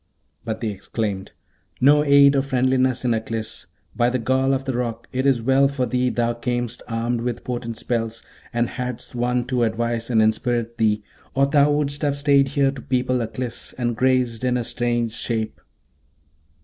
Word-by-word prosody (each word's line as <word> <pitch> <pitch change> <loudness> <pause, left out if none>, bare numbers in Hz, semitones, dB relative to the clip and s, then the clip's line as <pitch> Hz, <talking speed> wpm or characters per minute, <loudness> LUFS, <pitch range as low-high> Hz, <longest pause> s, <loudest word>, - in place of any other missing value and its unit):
But 110 +1 -4
they 110 -2 -1
exclaimed, 100 0 -4 0.5
'No 145 +3 +5
aid 140 -1 +6
or 135 - +3
friendliness 130 -1 +1
in 120 - +3
Aklis! 110 -3 -4 0.3
By 120 0 +3
the 130 - 0
gall 130 +2 +1
of 135 0 -1
the 135 - -1
Roc! 120 -1 -3
it 130 +2 0
is 125 -4 +2
well 135 +2 +4
for 135 -2 -1
thee 125 0 +1
thou 120 -1 0
camest 120 0 -3
armed 115 +1 -1
with 120 0 -3
potent 120 -2 -4
spells, 115 -1 -2 0.3
and 120 0 +1
hadst 125 -1 -5
one 125 0 0
to 125 -1 -1
advise 115 +1 -1
and 115 -3 +3
inspirit 115 +2 0
thee, 105 -1 +2 0.3
or 135 +1 +4
thou 145 +1 +4
wouldst 145 0 -1
have 145 -2 0
stayed 140 -1 +4
here 135 0 +2
to 135 -2 -9
people 125 0 0
Aklis, 115 +1 -5
and 120 -2 -1
grazed 125 -2 +1
in 125 -1 +2
a 120 - -1
strange 120 -1 -1
shape.' 115 -2 -3
125 Hz, 175 wpm, -22 LUFS, 115-130 Hz, 0.5 s, aid